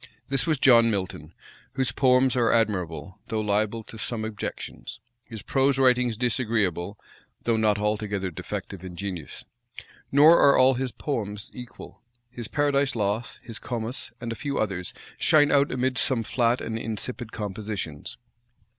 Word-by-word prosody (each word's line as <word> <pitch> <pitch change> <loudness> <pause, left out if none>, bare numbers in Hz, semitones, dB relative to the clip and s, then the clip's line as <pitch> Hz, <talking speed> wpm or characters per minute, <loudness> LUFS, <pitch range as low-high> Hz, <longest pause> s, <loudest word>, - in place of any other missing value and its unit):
This 135 +3 +1
was 155 -2 +2
John 120 -3 +6
Milton, 95 -6 -3 0.4
whose 130 -2 0
poems 130 0 +3
are 120 -2 +3
admirable, 95 -3 -1
though 110 -2 -2
liable 110 +1 0
to 110 - -10
some 110 -2 -3
objections; 110 -2 -6 0.3
his 110 -4 -9
prose 135 0 +2
writings 125 -3 +3
disagreeable, 105 -6 0 0.5
though 115 - +2
not 110 -2 +2
altogether 105 -2 -1
defective 95 +2 -6
in 90 -2 -8
genius. 90 -4 -6 0.7
Nor 150 +5 +7
are 140 - +6
all 130 +1 +6
his 130 0 -2
poems 105 -8 -4
equal: 125 -1 -11 0.3
his 120 -3 -6
Paradise 140 -1 +1
Lost, 105 +2 -2
his 115 -2 -5
Comus, 120 0 -4
and 115 -1 -5
a - - -3
few 140 +3 -3
others, 95 -4 -2 0.3
shine 145 -2 +5
out 140 0 +3
amidst 130 +1 +1
some 125 -4 +1
flat 120 +2 +1
and 115 0 -3
insipid 115 +1 -4
compositions. 105 -3 -5
115 Hz, 145 wpm, -26 LUFS, 105-125 Hz, 0.7 s, Nor